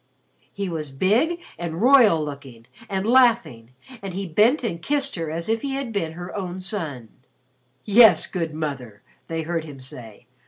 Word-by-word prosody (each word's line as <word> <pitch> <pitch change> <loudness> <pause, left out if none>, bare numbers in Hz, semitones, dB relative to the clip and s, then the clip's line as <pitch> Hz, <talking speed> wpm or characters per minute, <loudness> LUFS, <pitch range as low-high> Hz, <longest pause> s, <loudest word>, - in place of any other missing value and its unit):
He 200 -1 -4
was 160 -4 -4
big 225 - +1 0.2
and 170 -1 -4
royal 230 - +5
looking 135 -5 -9 0.2
and 190 0 -2
laughing 230 - +2 0.3
and 195 -2 -6
he 195 +1 -3
bent 215 - +3
and 170 -8 -3
kissed 280 +4 -1
her 165 -3 -4
as 165 +2 -4
if 225 0 0
he 275 -1 -3
had 270 -4 -4
been 165 -6 -2
her 175 +2 -8
own 185 -2 -4
son. 160 - -5 0.8
"Yes, 225 +2 +6
good 165 -4 -3
Mother," 135 -9 -6 0.2
they 165 -1 -3
heard 165 0 -2
him 145 -4 -10
say. 120 -4 -10
175 Hz, 165 wpm, -23 LUFS, 150-225 Hz, 0.8 s, Yes